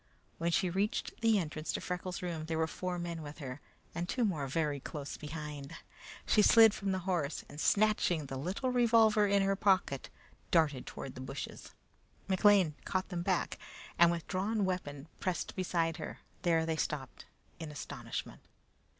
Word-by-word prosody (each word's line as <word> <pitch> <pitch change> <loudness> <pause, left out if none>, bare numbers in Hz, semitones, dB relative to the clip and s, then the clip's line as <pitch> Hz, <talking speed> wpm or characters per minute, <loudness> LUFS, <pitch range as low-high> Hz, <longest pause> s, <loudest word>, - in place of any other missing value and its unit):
When 170 - +1
she 185 +2 +2
reached 200 +9 -1
the 225 -2 +4
entrance 155 -3 -2
to - - -1
Freckles' 180 0 -4
room, 165 -3 -3
there 160 -1 -1
were 160 - +2
four 180 +2 -4
men 170 -1 -4
with 150 -1 -8
her, 135 -1 -7 0.3
and 170 +2 -3
two 245 -2 +1
more 155 -9 -1
very 145 0 0
close 145 +1 -6
behind. 150 -1 -7 0.5
She 215 - +4
slid 225 0 +8
from 200 -2 -2
the 190 - 0
horse, 170 -6 -1
and 145 +2 -7
snatching 200 -7 +3
the 135 - -6
little 185 - -2
revolver 225 -4 +5
from 200 0 +4
her 195 0 +2
pocket, 190 -9 +1 0.4
darted 150 -6 +2
toward 135 - -6
the 130 - -8
bushes. 135 +1 -7 0.5
McLean 190 -3 +5
caught 185 -1 -2
them 175 -3 -3
back, 180 0 0 0.4
and 170 0 +8
with 170 -1 -2
drawn 200 +2 0
weapon, 150 -6 -3
pressed 185 -2 -2
beside 170 -3 0
her. - - -7 0.2
There 165 -2 +2
they 160 -1 -1
stopped 140 -4 -3 0.3
in 160 -2 -5
astonishment. 145 - -6
170 Hz, 165 wpm, -33 LUFS, 150-195 Hz, 0.5 s, slid